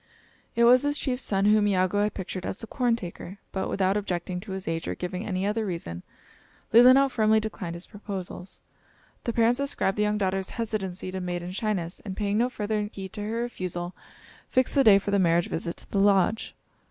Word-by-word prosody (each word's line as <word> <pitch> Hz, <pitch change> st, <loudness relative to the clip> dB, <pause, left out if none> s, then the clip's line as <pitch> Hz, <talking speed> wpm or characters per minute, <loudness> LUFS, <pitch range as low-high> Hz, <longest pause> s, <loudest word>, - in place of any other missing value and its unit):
It 235 Hz, -, +3 dB
was 245 Hz, +2 st, +7 dB
this 290 Hz, 0 st, +1 dB
chief's 260 Hz, -3 st, -1 dB
son 195 Hz, -4 st, 0 dB
whom 210 Hz, 0 st, +4 dB
Iagoo 185 Hz, 0 st, +2 dB
had 210 Hz, 0 st, 0 dB
pictured 185 Hz, -1 st, -5 dB
as 190 Hz, -, -4 dB
the -, -, -4 dB
corn 240 Hz, 0 st, +1 dB
taker, 185 Hz, -2 st, -8 dB
but, 190 Hz, -, -2 dB
without 190 Hz, 0 st, +1 dB
objecting 180 Hz, -3 st, -2 dB
to 190 Hz, +1 st, -7 dB
his 190 Hz, 0 st, -6 dB
age 165 Hz, 0 st, -2 dB
or -, -, -2 dB
giving 180 Hz, +2 st, -4 dB
any 190 Hz, -1 st, -1 dB
other 215 Hz, +2 st, 0 dB
reason, 170 Hz, -, -4 dB, 0.7 s
Leelinau 255 Hz, +4 st, +8 dB
firmly 220 Hz, -4 st, +3 dB
declined 210 Hz, -5 st, -5 dB
his 170 Hz, -, -8 dB
proposals. 195 Hz, -3 st, -8 dB, 0.6 s
The 235 Hz, -, 0 dB
parents 235 Hz, +3 st, +3 dB
ascribed 275 Hz, -8 st, 0 dB
the -, -, +3 dB
young 210 Hz, 0 st, +1 dB
daughter's 190 Hz, -1 st, -1 dB
hesitancy 195 Hz, -5 st, -3 dB
to 190 Hz, 0 st, -4 dB
maiden 175 Hz, 0 st, -4 dB
shyness, 190 Hz, -4 st, -2 dB
and 190 Hz, -3 st, -6 dB
paying 205 Hz, 0 st, 0 dB
no 245 Hz, +2 st, +2 dB
further 210 Hz, -3 st, -2 dB
heed 190 Hz, -1 st, -8 dB
to 210 Hz, -, -5 dB
her 225 Hz, +3 st, -2 dB
refusal, 180 Hz, -6 st, -4 dB, 0.6 s
fixed 255 Hz, -1 st, +2 dB
a 275 Hz, -, +5 dB
day 210 Hz, -5 st, +8 dB
for 200 Hz, +1 st, -2 dB
the 200 Hz, -, +3 dB
marriage 170 Hz, -1 st, +2 dB
visit 170 Hz, +1 st, -3 dB
to -, -, -13 dB
the 200 Hz, -, +1 dB
lodge. 200 Hz, +2 st, +2 dB
200 Hz, 200 wpm, -26 LUFS, 185-220 Hz, 0.7 s, Leelinau